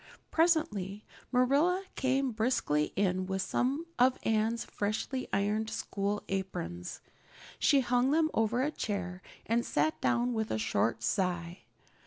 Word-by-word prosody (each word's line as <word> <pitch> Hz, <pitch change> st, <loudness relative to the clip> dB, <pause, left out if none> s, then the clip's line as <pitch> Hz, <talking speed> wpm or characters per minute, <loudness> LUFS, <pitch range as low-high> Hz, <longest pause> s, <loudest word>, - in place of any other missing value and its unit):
Presently 310 Hz, -, +1 dB, 0.3 s
Marilla 285 Hz, +9 st, +3 dB
came 265 Hz, 0 st, +1 dB
briskly 220 Hz, -, +1 dB
in 185 Hz, -1 st, +1 dB
with 190 Hz, 0 st, -1 dB
some 275 Hz, +6 st, 0 dB
of 255 Hz, +1 st, +5 dB
Anne's 225 Hz, +1 st, +1 dB
freshly 220 Hz, +5 st, -2 dB
ironed 210 Hz, +2 st, 0 dB
school 205 Hz, -2 st, -2 dB
aprons. 90 Hz, -, -4 dB, 0.6 s
She 280 Hz, -2 st, +4 dB
hung 250 Hz, +1 st, +2 dB
them 315 Hz, +2 st, +3 dB
over 225 Hz, +3 st, +1 dB
a 295 Hz, -, 0 dB
chair 185 Hz, -, -3 dB, 0.2 s
and 235 Hz, +2 st, +1 dB
sat 315 Hz, -, 0 dB
down 245 Hz, 0 st, +2 dB
with 220 Hz, -1 st, -1 dB
a -, -, 0 dB
short 110 Hz, +1 st, 0 dB
sigh. 175 Hz, -, -1 dB
220 Hz, 130 wpm, -31 LUFS, 190-260 Hz, 0.6 s, of